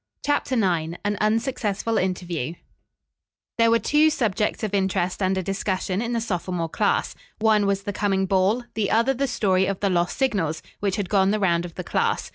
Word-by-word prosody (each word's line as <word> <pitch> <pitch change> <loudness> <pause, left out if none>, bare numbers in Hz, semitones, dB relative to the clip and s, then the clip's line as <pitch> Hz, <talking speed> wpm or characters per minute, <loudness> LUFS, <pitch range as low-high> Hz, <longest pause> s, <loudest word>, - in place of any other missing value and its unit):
CHAPTER 290 -2 0
IX 170 -7 0
AN 205 0 +1
UNSUCCESSFUL 225 -1 0
INTERVIEW 175 -5 -2 1.0
There 230 0 +5
were 230 - +5
two 300 +6 +3
subjects 220 -9 -1
of 210 -2 -2
interest 190 -1 0
under 190 0 +1
discussion 190 0 -2
in 240 0 -2
the 230 - +1
sophomore 180 -5 -2
class. - - 0 0.2
One 215 -2 +3
was 195 0 0
the 205 0 -4
coming 195 -1 +1
ball, 195 +5 +2
the 215 -3 -1
other 230 +4 +3
the 275 +2 -1
story 190 -6 +1
of 195 -1 -2
the 200 -2 +1
lost 175 0 0
signals, 195 - 0 0.2
which 200 -2 0
had 200 -2 -2
gone 195 -1 +3
the 215 +1 +1
round 175 -3 +1
of 170 - -10
the - - -5
class. - - -1
200 Hz, 185 wpm, -24 LUFS, 185-225 Hz, 1.0 s, There